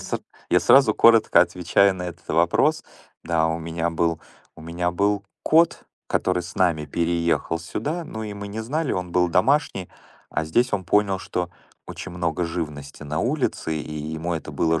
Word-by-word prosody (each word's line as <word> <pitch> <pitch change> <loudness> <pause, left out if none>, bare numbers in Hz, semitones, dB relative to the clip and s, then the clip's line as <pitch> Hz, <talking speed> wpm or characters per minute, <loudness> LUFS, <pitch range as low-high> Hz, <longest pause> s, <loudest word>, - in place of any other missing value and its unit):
ср - - -4 0.3
я - - +5
сразу 135 -6 +5
коротко 115 -1 +6
отвечаю 95 +2 +3
на 90 - -6
этот 85 -2 -8
вопрос. 85 +2 +2 0.4
Да, 80 -1 +1
у 80 +1 -1
меня 85 +1 -2
был 85 -1 0 0.4
у - - -13
меня 85 +2 -2
был 100 +2 0 0.2
кот, 165 +2 +3 0.2
который 90 -1 0
с 85 +2 -10
нами 85 -5 +1
переехал 85 0 0
сюда. 145 - -4
Ну, 110 -7 -7
и 105 -1 -5
мы 100 0 -7
не 110 +2 -5
знали. 145 +6 -2
Он 90 -1 -3
был 90 -1 +3
домашний, 100 - +1 0.4
а 80 - -1
здесь 120 +11 +1
он 95 -3 -1
понял, 100 +1 +2
что 90 -2 -3 0.4
очень 95 - -8
много 85 0 -1
живности 75 -4 -5
на 75 +1 -3
улице, 125 - -1
и 75 0 -6
ему 80 +3 -3
это 80 - -6
было 80 0 +1
90 Hz, 175 wpm, -23 LUFS, 80-100 Hz, 0.4 s, коротко